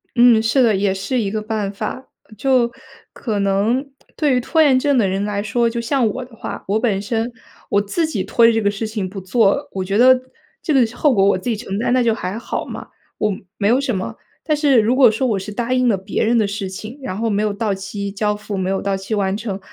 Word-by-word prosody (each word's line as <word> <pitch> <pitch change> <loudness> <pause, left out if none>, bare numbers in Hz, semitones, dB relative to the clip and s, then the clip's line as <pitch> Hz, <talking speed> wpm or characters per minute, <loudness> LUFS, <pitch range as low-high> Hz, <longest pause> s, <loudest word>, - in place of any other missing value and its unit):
嗯， 240 -2 +6
是 225 +4 +3
的， 225 -4 +3
也 195 0 +1
是 195 +6 -2
一 205 - -1
个 215 +1 -3
办 215 -2 -3
法。 215 +6 -5 0.3
就 250 -1 +2 0.4
可 215 -5 -3
能 210 +8 0 0.2
对 290 -4 +2
于 - - +3
拖 320 +6 +1
延 275 -4 +5
症 280 0 +2
的 205 -5 +3
人 195 +2 -1
来 205 -1 -2
说， 235 +3 +1
就 235 - -4
像 245 -1 +1
我 255 +5 -3
的 240 -2 -17
话， - - -7
我 210 +2 +1
本 215 -5 0
身 225 +3 -2 0.4
我 200 - +3
自 315 +12 -1
己 315 - -2
拖 235 - +3
着 230 - +7
这 225 - +1
个 205 - +2
事 205 +2 -3
情 210 -4 -3
不 195 0 -7
做， 225 +8 +1
我 190 -1 -3
觉 195 +2 -1
得 255 +1 +6 0.4
这 310 - -1
个 255 -3 +5
后 295 -3 +3
果 195 -4 +3
我 200 -2 +3
自 240 - -4
己 225 - +1
承 200 -3 -5
担， 240 +2 +1
那 255 - +3
就 230 -1 +2
还 200 -1 -4
好 235 - -4
嘛， - - -8 0.3
我 210 - +1 0.3
没 200 - +1
有 245 +4 +4
什 250 -6 -1
么。 185 - -4 0.3
但 305 -2 +1
是 285 -5 +4
如 225 +4 +2
果 255 -5 +6
说 255 +4 -1
我 215 -5 +1
是 195 +3 -7
答 240 +4 -2
应 255 -1 +2
了 205 -4 +3
别 195 +4 -2
人 235 +2 +2
的 210 -2 +2
事 200 -1 -4
情， 215 +8 -8
然 220 -8 -4
后 230 +1 -1
没 205 -1 0
有 210 - 0
到 210 -1 -1
期 200 +1 -5
交 210 +1 -1
付， 210 -1 -6
没 185 0 -1
有 195 - -1
到 195 -1 -1
期 195 +3 -5
完 195 -1 0
成， 205 -4 -4
220 Hz, 275 characters per minute, -19 LUFS, 200-245 Hz, 0.4 s, 着